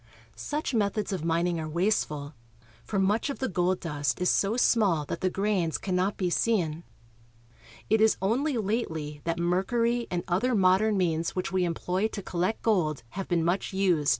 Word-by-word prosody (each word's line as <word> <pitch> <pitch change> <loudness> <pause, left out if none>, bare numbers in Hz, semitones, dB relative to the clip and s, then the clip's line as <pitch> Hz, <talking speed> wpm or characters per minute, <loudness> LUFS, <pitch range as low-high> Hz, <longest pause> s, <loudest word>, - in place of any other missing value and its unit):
Such 295 -1 -3
methods 210 -1 0
of 180 -5 -3
min 165 +1 +1
ing 175 -2 -1
are 155 -1 -4
wasteful, 155 -5 -1 0.5
for 205 - -3
much 200 +7 +1
of 280 - -3
the 260 - -1
gold 180 -1 0
dust 145 -4 -2
is 180 - +2
so 205 +4 +1
small 200 -11 +3
that - - -5
the 185 - +2
grains 195 -4 0
cannot 185 +1 -1
be 180 -2 -1
seen. 170 -7 0 1.0
It 220 0 +3
is 220 0 +4
only 250 +8 0
lately 160 -9 -2
that 165 0 -1
mercury 230 +8 +1
and 175 -1 -2
other 225 +8 +1
rnodern 195 +2 +3
means 165 -3 0
which 185 +1 -2
we 185 -1 +1
employ 180 +4 -1
to 210 -3 -7
collect 180 +5 -2
gold 160 - +1
have 195 +6 -5
been 170 -2 +1
much 180 +3 -1
used. 180 -7 +2
185 Hz, 180 wpm, -28 LUFS, 170-215 Hz, 1.0 s, is